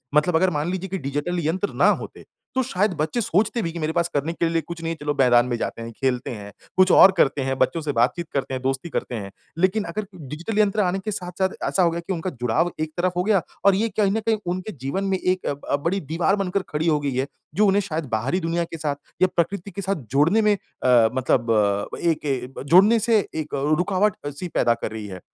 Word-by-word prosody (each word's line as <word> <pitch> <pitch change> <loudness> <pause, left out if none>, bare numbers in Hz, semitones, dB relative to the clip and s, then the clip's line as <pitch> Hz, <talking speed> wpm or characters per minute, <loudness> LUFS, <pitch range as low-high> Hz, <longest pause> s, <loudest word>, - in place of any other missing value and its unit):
मतलब 160 +3 +3
अगर 185 +3 +4
मान 150 0 -2
लीजिए 190 +1 -4
कि 190 - -2
डिजिटल 145 +5 -2
यंत्र 185 +5 -1
ना - - +4
होते, - - -10 0.3
तो 260 - +3
शायद 205 -4 0
बच्चे 165 +10 0
सोचते 210 +4 +1
भी 165 - -2
कि, 170 - -6
"मेरे 155 0 -1
पास 170 0 +1
करने 150 +4 -1
के 170 - 0
लिए 165 -1 +1
कुछ 170 0 -8
नहीं 165 - -1
है, 165 - -10
चलो 150 0 -1
मैदान 125 -2 +5
में 125 - -1
जाते 115 - -4
हैं, 115 0 -6
खेलते 125 0 -1
हैं, 100 -3 -8 0.3
कुछ 185 0 +5
और 190 - +8
करते 140 -3 +3
हैं, 135 0 -1
बच्चों 130 +6 +1
से 150 -1 -2
बातचीत 125 +8 +1
करते 135 -1 -2
हैं, 130 - -3
दोस्ती 135 +5 -2
करते 125 - -3
हैं।" 100 -3 -6 0.3
लेकिन 190 +3 +2
अगर 210 +3 -4 0.2
डिजिटल 175 - -3
यंत्र 210 0 +3
आने 190 0 0
के 215 +3 -4
साथ-साथ 190 -1 -2 0.2
ऐसा 185 - +2
हो 170 - +3
गया 170 +1 -3
कि 195 - 0
उनका 175 +1 -3
जुड़ाव 155 +9 +1
एक 155 0 -2
तरफ 180 +1 +1
हो 180 - +2
गया, 205 -3 +3 0.2
और 200 -1 +6
ये 225 +4 +1
कहीं 200 -2 +3
न 220 - 0
कहीं 220 -1 +3 0.2
उनके 185 +4 -5
जीवन 185 +9 -2
में 195 -1 +1
एक 185 0 0
अ, - - +1
ब 140 0 -3
बड़ी 195 +3 +1
दीवार 170 +4 +2
बनकर 195 -1 -1
खड़ी 155 +2 -1
हो 150 -2 +3
गई 140 -1 -2
है, 130 +2 0 0.3
जो 210 - +4
उन्हें 200 +1 +3
शायद 165 -5 -3
बाहरी 120 +12 0
दुनिया 170 0 -1
के 165 0 -7
साथ 150 -2 -2 0.3
या 185 - +6
प्रकृति 195 +3 -1
के 200 - -5
साथ 195 0 -1 0.2
जोड़ने 160 +11 +4
में 210 -1 +4
अ, 125 - +2
मतलब 115 -6 +1
एक 165 -3 0
ए 130 -2 -2
जोड़ने 195 +9 +6
से 225 0 +3 0.2
एक 155 -1 -4 0.2
रुकावट-सी 180 -4 -1
पैदा 120 - +3
कर 115 - -5
रही 110 -1 -6
है। 95 -2 -8
170 Hz, 240 wpm, -23 LUFS, 135-190 Hz, 0.3 s, और